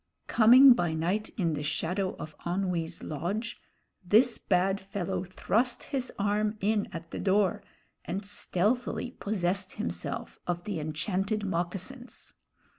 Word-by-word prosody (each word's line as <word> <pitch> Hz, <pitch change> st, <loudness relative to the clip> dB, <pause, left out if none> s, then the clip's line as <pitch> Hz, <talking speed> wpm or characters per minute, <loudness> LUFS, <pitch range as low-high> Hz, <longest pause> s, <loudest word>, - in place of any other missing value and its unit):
Coming 250 Hz, +4 st, +8 dB
by 175 Hz, -8 st, 0 dB
night 185 Hz, +7 st, -1 dB
in 170 Hz, -6 st, +1 dB
the 145 Hz, -, -3 dB
shadow 180 Hz, +5 st, -1 dB
of 155 Hz, 0 st, -8 dB
Onwee's 175 Hz, -2 st, -2 dB
lodge, 200 Hz, -, -3 dB, 0.4 s
this 225 Hz, +7 st, +4 dB
bad 190 Hz, +1 st, +1 dB
fellow 190 Hz, -1 st, -3 dB
thrust 225 Hz, +6 st, 0 dB
his 260 Hz, -2 st, -3 dB
arm 210 Hz, +1 st, 0 dB
in 205 Hz, +1 st, +1 dB
at 165 Hz, -2 st, -8 dB
the -, -, -4 dB
door 195 Hz, -1 st, +2 dB, 0.4 s
and 195 Hz, +3 st, -4 dB
stealthily 210 Hz, +5 st, -1 dB
possessed 195 Hz, -3 st, -1 dB
himself 85 Hz, 0 st, -4 dB
of 175 Hz, 0 st, -2 dB
the 195 Hz, -4 st, -3 dB
enchanted 190 Hz, +7 st, -1 dB
moccasins. 190 Hz, +8 st, -4 dB
195 Hz, 125 wpm, -29 LUFS, 175-215 Hz, 0.4 s, Coming